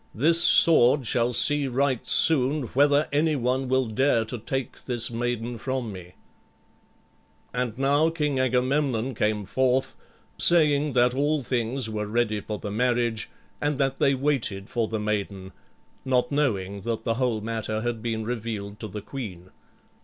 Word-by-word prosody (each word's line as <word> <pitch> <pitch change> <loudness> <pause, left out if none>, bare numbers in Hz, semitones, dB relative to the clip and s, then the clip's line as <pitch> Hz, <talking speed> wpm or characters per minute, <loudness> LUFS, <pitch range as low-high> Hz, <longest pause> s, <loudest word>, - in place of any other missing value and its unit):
This 165 +8 +4
sword 135 -4 +7
shall 120 +1 +1
see 145 +3 +3
right 130 -1 -1
soon 145 -1 +4
whether 145 +2 +2
any 150 +2 +1
one 130 +1 -1
will 130 0 +1
dare 115 +1 0
to 120 +2 -4
take 135 +3 -6
this 120 -2 -1
maiden 120 0 -4
from 130 -2 -4
me." 90 -1 -12 1.4
And 125 -2 -3
now 140 +4 +2
King 150 -5 -2
Agamemnon 130 0 0
came 105 -2 -2
forth, 130 +5 -1 0.4
saying 150 -4 +5
that 125 0 +2
all 145 +2 -1
things 120 0 -2
were 105 -1 -4
ready 110 -1 -1
for 105 +1 -6
the 105 - -7
marriage, 120 0 -1 0.3
and 145 -1 -1
that 135 -1 -1
they 140 -1 +2
waited 125 -8 -2
for 115 -3 -1
the 110 0 -4
maiden, 100 -3 -4 0.5
not 125 -1 0
knowing 100 -9 -2
that 115 +2 -4
the 115 - -1
whole 120 -4 0
matter 110 0 -4
had 120 -1 -4
been 110 -1 -4
revealed 110 -3 -5
to 110 - -6
the 105 0 -8
queen. 95 -9 -9
125 Hz, 155 wpm, -24 LUFS, 110-135 Hz, 1.4 s, sword